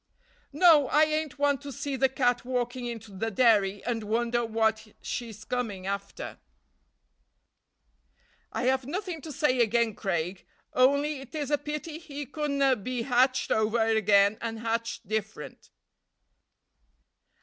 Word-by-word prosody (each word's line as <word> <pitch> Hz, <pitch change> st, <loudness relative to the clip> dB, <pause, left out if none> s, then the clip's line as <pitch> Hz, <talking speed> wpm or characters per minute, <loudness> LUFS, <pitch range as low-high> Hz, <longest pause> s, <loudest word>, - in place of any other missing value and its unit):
"No, 300 Hz, -2 st, +6 dB
I 300 Hz, +4 st, +4 dB
ain't 310 Hz, -2 st, -1 dB
one 285 Hz, -1 st, +2 dB
to 285 Hz, 0 st, -8 dB
see 280 Hz, +2 st, -4 dB
the 265 Hz, 0 st, +3 dB
cat 245 Hz, -2 st, +1 dB
walking 245 Hz, 0 st, -2 dB
into 225 Hz, -3 st, -7 dB
the 225 Hz, +4 st, -2 dB
dairy 205 Hz, -3 st, +3 dB
and 230 Hz, -2 st, -2 dB
wonder 235 Hz, +2 st, 0 dB
what 220 Hz, -1 st, 0 dB, 0.2 s
she's 220 Hz, -3 st, -5 dB
come 250 Hz, -2 st, -1 dB
after." 195 Hz, +1 st, -6 dB, 2.1 s
"I -, -, -3 dB
have 260 Hz, 0 st, +1 dB
nothing 360 Hz, 0 st, -4 dB
to 315 Hz, -, -8 dB
say 260 Hz, -2 st, +1 dB
again' 235 Hz, -1 st, +2 dB
Craig, 180 Hz, -2 st, -3 dB, 0.3 s
on'y 280 Hz, +3 st, +3 dB
it 270 Hz, +2 st, -11 dB
is 295 Hz, -2 st, -3 dB
a 295 Hz, -, +4 dB
pity 300 Hz, +2 st, -5 dB
he 290 Hz, -3 st, -7 dB
couldna 280 Hz, -1 st, +1 dB
be 240 Hz, +3 st, -3 dB
hatched 255 Hz, +1 st, +2 dB
o'er 220 Hz, +1 st, +2 dB
again, 205 Hz, 0 st, +4 dB
and 225 Hz, -1 st, -3 dB
hatched 230 Hz, -1 st, -3 dB
different." 215 Hz, 0 st, -5 dB
245 Hz, 135 wpm, -28 LUFS, 220-280 Hz, 2.1 s, No